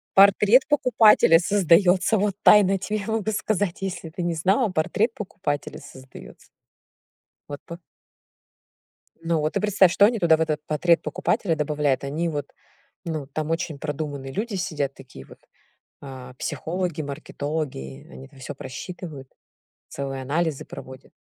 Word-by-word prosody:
Портрет 200 +5 +6
покупателя 230 - +5
создаётся. 185 +2 +3
Вот 200 -1 0
тайно 205 -2 +7
я 195 - +1
тебе 210 +2 -3
могу 220 -1 -1
сказать, 205 -3 -1
если 175 -4 -5
ты 175 +3 -7
не 170 -1 -1
знала, 195 - +2
портрет 200 +7 0
покупателя 185 -7 -4
создаётся. 130 0 -14 1.0
Вот 145 - -7
пы 170 - -8 1.4
Ну 165 -1 0
вот, 155 +4 -2
и - - 0
представь, 200 -3 +4
что 200 +2 +5
они 230 +1 +1
туда, 165 -3 +4
в - - -3
этот 155 -2 -1
портрет 165 +3 +2
покупателя 180 -1 -1
добавляют, 150 -2 0
они, 155 +5 -2
вот, 145 -2 -4 0.6
ну, 155 -4 -4
там 155 +2 -4
очень 165 -3 -3
продуманные 145 -3 -5
люди 210 - -3
сидят, 150 -7 -2
такие 95 - -13
вот, - - -16 0.6
а, 130 -2 -10
психологи, 160 +4 -3
маркетологи, 140 - -5
они 65 +1 -11
это - - -20
всё 135 +2 -7
просчитывают, 145 0 -8 0.6
целые 135 -1 -5
анализы 155 +2 -1
проводят. 130 +1 -11
165 Hz, 140 wpm, -24 LUFS, 145-195 Hz, 1.4 s, тайно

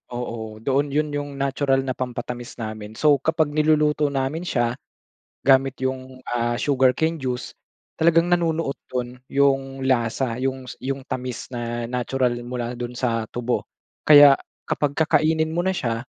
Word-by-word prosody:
Oo, 110 -2 -6
doon 140 +1 0
'yon 150 0 +1
'yong 145 0 -3
natural 135 -1 +1
na 130 - -2
pampatamis 125 0 -5
namin. 110 -1 -6
So, 145 -1 +4
kapag 155 0 +1
niluluto 150 -1 +3
namin 140 +5 -2
siya 120 +1 0 0.6
gamit 135 0 +3
'yong, 130 0 -4
ah, 120 0 0
sugarcane 140 +4 +2
juice 125 -4 -4 0.4
talagang 165 +1 +4
nanunuot 165 -4 +1 0.2
doon 125 0 -3 0.2
'yong 135 -1 +1
lasa 120 -1 +1
'yong 130 0 -3 0.2
'yong 135 0 -2
tamis 125 -1 -4
na 120 -1 -4
natural 125 0 0
mula 120 0 -4
do'n 120 0 -4
sa 115 -2 -1
tubo. 120 0 -1 0.4
Kaya 145 -2 +9 0.3
kapag 145 -1 0
kakainin 160 0 +2
mo 175 +2 -1
na 190 - +3
siya, 115 -6 -2
130 Hz, 140 wpm, -23 LUFS, 120-145 Hz, 0.6 s, Kaya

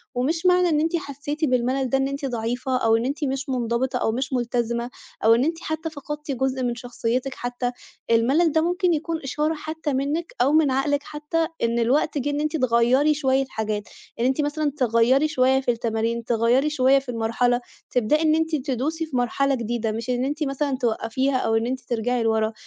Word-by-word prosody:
ومش 320 +8 -1
معنى 360 -1 +4
إن 305 -2 +2
أنتِ 325 +3 0
حسّيتِ 295 0 -3
بالملل 255 0 0
ده 270 - +2
إن 270 0 +1
أنتِ 275 +1 -4
ضعيفة 245 +1 -1
أو 225 -2 +3
إن 230 +2 0
أنتِ 285 +3 -3
مش 270 0 -2
منضبطة 250 0 0
أو 220 - 0
مش 260 +3 -3
ملتزمة 240 -1 -1 0.3
أو 225 +1 +6
إن 240 - +2
أنتِ 325 +1 -1
حتى 315 -1 -3
فقدتِ 295 -1 -6
جزء 265 0 -1
من 240 -1 -1
شخصيتِك 245 +2 -2
حتى، 245 0 -3 0.4
الملل 270 +9 +3
ده 320 +2 +2
ممكن 355 +1 +1
يكون 325 +1 -2
إشارة 300 +4 -1
حتى 310 -1 -4
منِّك 290 +6 -2
أو 265 +3 +4
من 305 -3 +4
عقلِك 285 +2 0
حتى 305 +2 -2 0.2
إن 235 0 +1
الوقت 270 +6 +1
جِه 280 +1 -1
إن 290 0 -1
أنتِ 305 +1 -1
تغيّري 255 +3 +3
شوية 270 -2 +1
حاجات، 215 -1 -2 0.4
إن 235 - +1
أنتِ 265 +3 +2
مثلًا 295 0 -1
تغيّري 250 +4 +3
شوية 260 -4 +2
في 245 - +1
التمارين، 230 0 -2
تغيّري 240 +5 +2
شوية 270 -2 +4
في 270 -2 -13
المرحلة، 245 +1 +1 0.3
تبدأي 250 +6 +2
إن 310 -1 +3
أنتِ 320 0 0
تدوسي 285 +4 -2
في 295 -5 -7
مرحلة 270 +3 +1
جديدة 230 -1 -2
مش 230 +3 -5
إن 250 +1 0
أنتِ 295 +3 -2
مثلًا 275 -1 -1
توقّفيها 250 +2 0
أو 225 -2 0
إن 225 +1 +1
أنتِ 260 +1 -2
ترجعي 240 0 -1
لوَرا. 220 0 +1
265 Hz, 195 wpm, -23 LUFS, 240-295 Hz, 0.4 s, أو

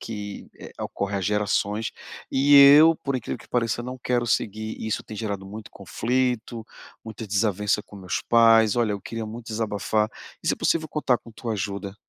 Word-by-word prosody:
que, 105 -2 -7
eh, - - -11
ocorre 100 0 -3
há - - -2
gerações, 105 +2 -1 0.4
e 140 +2 +4
eu, 150 +4 +8
por 140 -2 -4
incrível 120 - -5
que - - -17
pareça, 120 -1 -1
não 125 +1 -7
quero 120 -1 0
seguir, 110 -1 -1
e - - -4
isso 110 - -2
tem 110 - -9
gerado 100 -3 -4
muito 105 +2 -9
conflito, 120 +2 -2 0.4
muita 110 0 -8
desavença 105 0 0
com 105 - -14
meus 95 -2 -4
pais. 115 -1 +5
Olha, 115 -3 +1
eu 100 - -4
queria 115 -1 -5
muito 115 +2 -9
desabafar, 110 -1 -1 0.3
e - - -2
se - - +2
possível 160 -1 0
contar 140 -5 0
com - - -17
a - - -18
tua 115 0 -4
ajuda. 100 -1 -4
110 Hz, 190 wpm, -24 LUFS, 105-120 Hz, 0.4 s, eu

